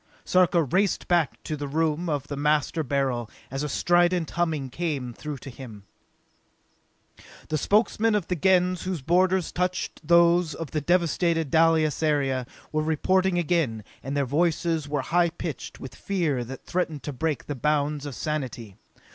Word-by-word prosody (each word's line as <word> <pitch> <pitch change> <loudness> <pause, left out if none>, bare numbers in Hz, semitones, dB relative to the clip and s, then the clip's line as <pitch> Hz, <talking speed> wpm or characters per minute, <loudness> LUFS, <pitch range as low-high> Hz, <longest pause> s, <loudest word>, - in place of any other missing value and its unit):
Sarka 180 -2 +3
raced 185 +8 0
back 170 -4 +1
to 155 - -3
the 145 -1 -5
room 160 +3 0
of 145 -3 -1
the 145 - -5
Master 150 +2 +1
Beryl 130 -5 -1 0.2
as 135 +1 -3
a 150 - -2
strident 175 +1 +2
humming 160 -6 -1
came 140 -6 -3
through 150 +3 -6
to 135 - -9
him. 115 -5 -10 1.7
The 155 - 0
Spokesmen 215 +4 +2
of 205 -5 0
the 180 - -1
Gens 180 0 +2
whose 180 -7 -3
borders 185 +3 +2
touched 180 +1 -2
those 170 0 +4
of 165 -3 -6
the 155 - -1
devasted 170 -2 +1
Dalis 160 -2 +3
area, 135 -5 +1 0.2
were 155 - 0
reporting 180 +4 +1
again, 160 -11 0 0.2
and 135 +2 -4
their 140 - +2
voices 160 +1 0
were 145 -1 0
high 175 +3 +2
pitched 165 -4 -6
with 130 -3 -8
fear 165 -10 -1
that 130 +2 -9
threatened 165 -5 -2
to 145 - -4
break 150 +3 -2
the 145 - -3
bounds 145 +1 0
of 140 - -6
sanity. 125 -9 -4
155 Hz, 160 wpm, -26 LUFS, 140-175 Hz, 1.7 s, those